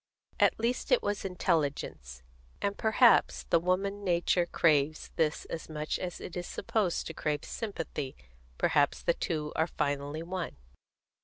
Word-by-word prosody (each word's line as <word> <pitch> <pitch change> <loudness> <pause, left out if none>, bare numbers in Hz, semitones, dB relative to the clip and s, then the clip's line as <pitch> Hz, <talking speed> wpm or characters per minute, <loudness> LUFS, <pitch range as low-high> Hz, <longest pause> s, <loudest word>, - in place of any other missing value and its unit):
At - - +4
least 235 +2 -1
it - - +5
was 205 0 -1
intelligence; 145 - -1 0.4
and 200 0 -1
perhaps 220 +1 +4
the 170 - +6
woman 195 +4 0
nature 175 -1 +2
craves 155 -2 +2
this 155 -2 0
as 165 - -6
much 155 0 -2
as 180 -1 -4
it 180 - -8
is 175 0 -4
supposed 200 -6 -1
to 160 - -5
crave 150 -2 -2
sympathy; 155 - -4 0.4
perhaps 145 -1 +2
the 170 - +3
two 155 -3 -3
are 160 - +2
finally 145 0 -2
one. 180 0 -4
170 Hz, 145 wpm, -30 LUFS, 150-195 Hz, 0.4 s, the